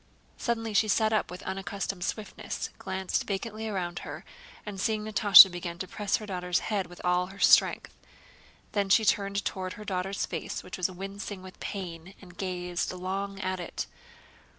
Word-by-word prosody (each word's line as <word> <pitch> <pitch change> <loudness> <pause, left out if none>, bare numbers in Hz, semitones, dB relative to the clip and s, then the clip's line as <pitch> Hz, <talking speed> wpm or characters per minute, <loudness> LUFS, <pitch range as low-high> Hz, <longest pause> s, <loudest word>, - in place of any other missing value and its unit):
Suddenly 225 -2 -2
she 215 +1 +4
sat 220 +1 +2
up 215 - +1
with 180 0 -8
unaccustomed 190 0 -4
swiftness, 210 +2 -4
glanced 190 -1 -2
vacantly 215 +2 -3
around 175 -4 -3
her, - - -8 0.4
and 200 -2 -5
seeing 215 0 0
Natásha 205 -3 +9
began 175 -1 -5
to 185 - -5
press 205 +1 0
her 215 - -4
daughter's 180 -3 -1 0.2
head 195 -3 0
with 175 - -13
all 180 0 +2
her 195 +1 -12
strength. - - +4 0.8
Then 200 -2 0
she 220 +3 +5
turned 200 -1 +1
toward 185 -1 -3
her 210 - -10
daughter's 195 0 -1
face 165 -3 -5
which 180 - -7
was 180 - +1
wincing 195 +1 -6
with 185 0 -12
pain 180 -1 -6
and 180 -3 -14
gazed 180 -2 -2
long 195 +2 -4
at 185 -1 -2
it. 175 - -4
190 Hz, 170 wpm, -29 LUFS, 180-205 Hz, 0.8 s, Natásha